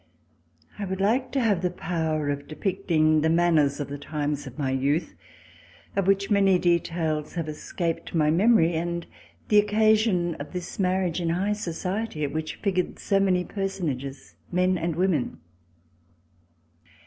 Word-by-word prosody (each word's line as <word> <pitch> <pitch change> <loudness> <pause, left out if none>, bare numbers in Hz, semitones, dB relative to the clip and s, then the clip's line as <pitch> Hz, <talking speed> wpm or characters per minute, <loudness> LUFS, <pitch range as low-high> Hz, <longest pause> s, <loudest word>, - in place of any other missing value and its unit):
I 205 - -2
WOULD 190 0 -4
like 235 +7 +1
to 275 - +2
have 210 -8 +2
the 180 - +1
power 160 -4 -2
of 145 0 -5
depicting 155 -3 +1
the 160 - +2
manners 160 -4 +3
of 145 - -3
the 145 0 -6
times 145 -1 -3
of 130 - -10
my 135 -3 -1
youth, 140 +5 0 0.8
of 195 -1 0
which 195 +1 +2
many 195 -2 +5
details 165 -3 0
have 165 -2 -2
escaped 165 +3 -4
my 155 -2 +3
memory, 175 -1 +4
and 170 +1 -2 0.4
the 210 - +6
occasion 210 -4 +3
of 145 - -7
this 180 +2 -6
marriage 185 -2 +1
in 170 - 0
high 190 +5 +1
society, 190 -1 -3
at 140 - -2
which 155 0 -3
figured 185 -3 -1
so 195 - +1
many 185 -2 +2
personages, 150 -9 -4 0.2
men 180 +1 +2
and 165 -1 -2
women. 175 - 0
175 Hz, 150 wpm, -26 LUFS, 155-195 Hz, 0.8 s, the